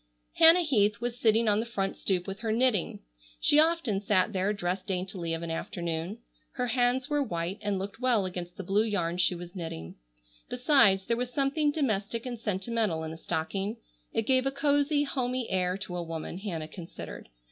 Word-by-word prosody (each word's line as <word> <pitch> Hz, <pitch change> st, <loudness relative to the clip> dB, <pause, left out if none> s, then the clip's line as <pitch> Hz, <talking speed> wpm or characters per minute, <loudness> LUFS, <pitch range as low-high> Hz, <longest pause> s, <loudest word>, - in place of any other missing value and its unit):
Hannah 330 Hz, +2 st, +8 dB
Heath 210 Hz, -8 st, +2 dB
was 240 Hz, 0 st, -4 dB
sitting 225 Hz, 0 st, +3 dB
on 210 Hz, 0 st, +4 dB
the 225 Hz, -, -1 dB
front 195 Hz, -4 st, -2 dB
stoop 180 Hz, -2 st, -1 dB
with 195 Hz, 0 st, -6 dB
her 225 Hz, -1 st, -2 dB
knitting. 230 Hz, -4 st, +1 dB, 0.4 s
She 295 Hz, -, +4 dB
often 315 Hz, -11 st, +2 dB
sat 205 Hz, 0 st, +2 dB
there 190 Hz, +2 st, +1 dB
dressed 185 Hz, -1 st, -3 dB
daintily 180 Hz, -3 st, -3 dB
of 165 Hz, -, -6 dB
an 165 Hz, -, -4 dB
afternoon. 170 Hz, +3 st, -3 dB, 0.4 s
Her 250 Hz, -, -1 dB
hands 245 Hz, +2 st, +1 dB
were 295 Hz, -1 st, +1 dB
white 175 Hz, -5 st, -3 dB
and 205 Hz, -2 st, -1 dB
looked 195 Hz, +3 st, -5 dB
well 245 Hz, -6 st, +2 dB
against 180 Hz, -1 st, -6 dB
the 195 Hz, -, -5 dB
blue 195 Hz, +4 st, +2 dB
yarn 180 Hz, -6 st, -1 dB
she 185 Hz, 0 st, +3 dB
was 175 Hz, +2 st, -9 dB
knitting. 125 Hz, -, -6 dB, 0.5 s
Besides 245 Hz, -7 st, +4 dB
there 235 Hz, -, 0 dB
was 250 Hz, 0 st, -2 dB
something 280 Hz, +3 st, +1 dB
domestic 230 Hz, -6 st, -1 dB
and 245 Hz, -2 st, -5 dB
sentimental 210 Hz, -4 st, -1 dB
in 160 Hz, -, -5 dB
a -, -, -9 dB
stocking. 195 Hz, +8 st, -2 dB, 0.3 s
It 225 Hz, -1 st, -1 dB
gave 260 Hz, +1 st, +3 dB
a -, -, +1 dB
cosy, 285 Hz, +1 st, +2 dB
homey, 255 Hz, -3 st, -2 dB
air 185 Hz, 0 st, +1 dB
to 190 Hz, -3 st, -6 dB
a 175 Hz, -, -2 dB
woman, 165 Hz, +1 st, -5 dB
Hannah 170 Hz, -6 st, -4 dB
considered. 165 Hz, -, -9 dB
205 Hz, 190 wpm, -29 LUFS, 180-250 Hz, 0.5 s, Hannah